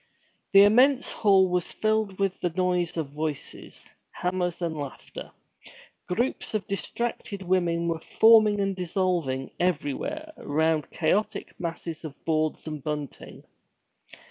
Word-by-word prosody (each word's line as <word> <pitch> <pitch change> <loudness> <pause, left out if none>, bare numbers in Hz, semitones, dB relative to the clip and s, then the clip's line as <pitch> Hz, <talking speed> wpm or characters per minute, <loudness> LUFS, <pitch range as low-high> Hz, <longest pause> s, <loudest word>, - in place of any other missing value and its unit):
The 195 0 +9
immense 255 +6 +4
hall 195 -3 +4
was 180 -1 -1
filled 215 -3 0
with 195 -2 -1
the 175 - +1
noise 180 -1 0
of 150 -4 -3
voices, 150 -1 -5 0.2
hammers, 180 -1 -2
and 170 -2 -2
laughter. 145 -3 -7 0.8
Groups 230 +4 -1
of 205 -3 -1
distracted 200 -1 -3
women 175 -2 +1
were 165 -1 -2
forming 220 0 +5
and 195 -1 0
dissolving 175 -7 -1
everywhere 185 - -2
around 155 0 0
chaotic 185 +6 -1
masses 165 -1 -5
of 150 -3 -7
boards 155 -1 0
and 155 -3 -6
bunting. 150 -2 -6
180 Hz, 120 wpm, -26 LUFS, 160-200 Hz, 0.8 s, The